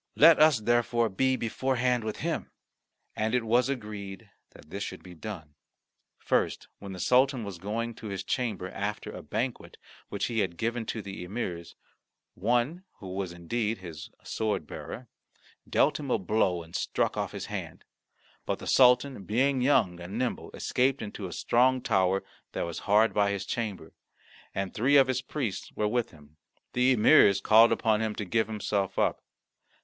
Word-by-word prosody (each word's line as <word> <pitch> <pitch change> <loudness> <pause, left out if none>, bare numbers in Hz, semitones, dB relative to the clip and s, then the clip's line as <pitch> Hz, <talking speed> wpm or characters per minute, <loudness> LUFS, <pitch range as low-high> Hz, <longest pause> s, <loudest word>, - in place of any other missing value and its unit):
Let 160 +2 +7
us 155 -7 +5
therefore 120 0 +2
be 130 +7 +1
beforehand 125 0 0
with 110 -1 -4
him." - - -2 0.7
And 110 +3 0
it 125 - +1
was 120 +3 +2
agreed 105 -4 -6 0.2
that 75 - -17
this 100 - -5
should - - -7
be 90 - -11
done. 85 -4 -8 0.6
First, - - 0
when 100 -1 -8
the 90 - -8
Sultan 130 +3 +3
was 100 -4 -7
going 115 +5 -3
to 110 - -9
his 95 -2 -4
chamber 105 -4 -2
after 105 +2 -4
a - - -8
banquet 120 +4 -4 0.3
which - - -2
he 115 -2 -1
had 90 -5 -1
given 115 +1 -2
to 110 - -4
the 95 -1 -7
emirs, 90 -4 -5 0.6
one, 120 - 0
who 95 -2 -9
was, 95 -2 -3
indeed, 105 +6 -2
his 85 -4 -9
sword 110 -2 -2
bearer, - - -8 0.6
dealt 150 - +3
him 140 -2 -5
a 125 - +3
blow 95 -3 0
and 80 +1 -13
struck - - 0
off - - -2
his - - -6
hand. - - -6 0.6
But - - 0
the - - -10
Sultan, 125 -3 +4
being 130 +5 +1
young 115 -10 +3
and 90 +5 -6
nimble, 125 0 -2
escaped 130 0 +1
into 105 -2 -6
a - - -9
strong 130 +7 +2
tower 95 -4 +1 0.3
that - - -2
was 85 -1 -5
hard 110 +2 +5
by 100 -1 +3
his 100 -1 -3
chamber, 110 -4 -4 0.6
and 95 -1 -2
three 135 +6 +4
of 135 - +7
his 130 0 -1
priests 120 -12 -4
were 105 - 0
with 120 +2 0
him. 75 -1 -19 0.4
The 125 +1 +4
emirs 100 -2 +6
called 110 +3 +6
upon 110 -1 +2
him 110 -1 -2
to 105 - -4
give 110 +4 +1
himself 105 -2 -2
up. - - +1
110 Hz, 175 wpm, -28 LUFS, 95-125 Hz, 0.7 s, Let